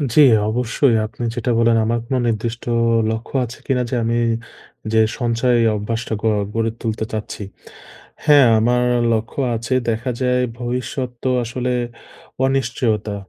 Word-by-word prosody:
জি, 150 Hz, -, +8 dB, 0.3 s
অবশ্যই। 125 Hz, +2 st, +1 dB
আপনি 110 Hz, +2 st, -7 dB
যেটা 120 Hz, 0 st, -2 dB
বললেন 115 Hz, 0 st, +4 dB
আমার 115 Hz, +1 st, 0 dB
কোন 130 Hz, +2 st, -2 dB
নির্দিষ্ট 115 Hz, +1 st, -2 dB
অ -, -, +2 dB, 0.3 s
লক্ষ্য 110 Hz, +4 st, -6 dB
আছে 120 Hz, +1 st, -10 dB
কিনা 125 Hz, -2 st, +1 dB
যে, 130 Hz, -, -1 dB
আমি 115 Hz, +1 st, 0 dB, 0.8 s
যে 110 Hz, -, +5 dB, 0.2 s
সঞ্চয় 120 Hz, 0 st, +1 dB, 0.2 s
অভ্যাসটা 115 Hz, +2 st, -3 dB
গড় 110 Hz, -2 st, +2 dB
গড়ে 115 Hz, 0 st, 0 dB
তুলতে 110 Hz, -1 st, -2 dB
চাচ্ছি? 110 Hz, -1 st, -5 dB, 0.8 s
হ্যাঁ, 145 Hz, -4 st, +6 dB
আমার 120 Hz, +2 st, +2 dB, 0.3 s
লক্ষ্য 115 Hz, +4 st, -3 dB, 0.2 s
আছে। 115 Hz, +3 st, -3 dB, 0.2 s
দেখা 115 Hz, +3 st, -1 dB
যায় 125 Hz, 0 st, +2 dB, 0.2 s
ভবিষ্যৎ 125 Hz, +1 st, -3 dB
তো 130 Hz, -, +1 dB
আসলে 125 Hz, +2 st, -3 dB, 0.7 s
অনিশ্চয়তা। 115 Hz, -5 st, 0 dB
115 Hz, 140 wpm, -20 LUFS, 110-125 Hz, 0.8 s, জি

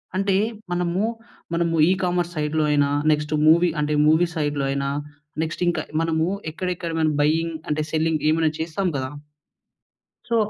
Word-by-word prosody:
అంటే 195 Hz, 0 st, +1 dB, 0.4 s
మనము, 175 Hz, +2 st, 0 dB, 0.5 s
మనము 170 Hz, 0 st, +1 dB, 0.2 s
ఈకామర్స్ 180 Hz, -2 st, 0 dB
సైడ్‌లో 150 Hz, +1 st, 0 dB
అయినా 145 Hz, -1 st, +3 dB, 0.2 s
నెక్స్ట్ 150 Hz, 0 st, 0 dB
మూవీ 170 Hz, +2 st, +6 dB
అంటే 150 Hz, 0 st, 0 dB
మూవీ 160 Hz, +3 st, +4 dB
సైడ్‌‌లో 145 Hz, -2 st, -1 dB
అయినా 140 Hz, 0 st, -1 dB, 0.5 s
నెక్స్ట్ 160 Hz, +2 st, -5 dB
ఇంకా 170 Hz, -2 st, +1 dB, 0.2 s
మనము 165 Hz, 0 st, +1 dB, 0.2 s
ఎక్కడెక్కడ 180 Hz, 0 st, -3 dB, 0.3 s
బైయింగ్ 160 Hz, +2 st, +1 dB
అంటే 150 Hz, +1 st, 0 dB
సెల్లింగ్ 160 Hz, -1 st, +1 dB
ఏమైనా 160 Hz, -1 st, +2 dB
చేస్తాం 170 Hz, +4 st, -1 dB
కదా! 130 Hz, 0 st, -3 dB, 1.2 s
సో, 230 Hz, -, +1 dB
160 Hz, 130 wpm, -23 LUFS, 150-175 Hz, 1.2 s, మూవీ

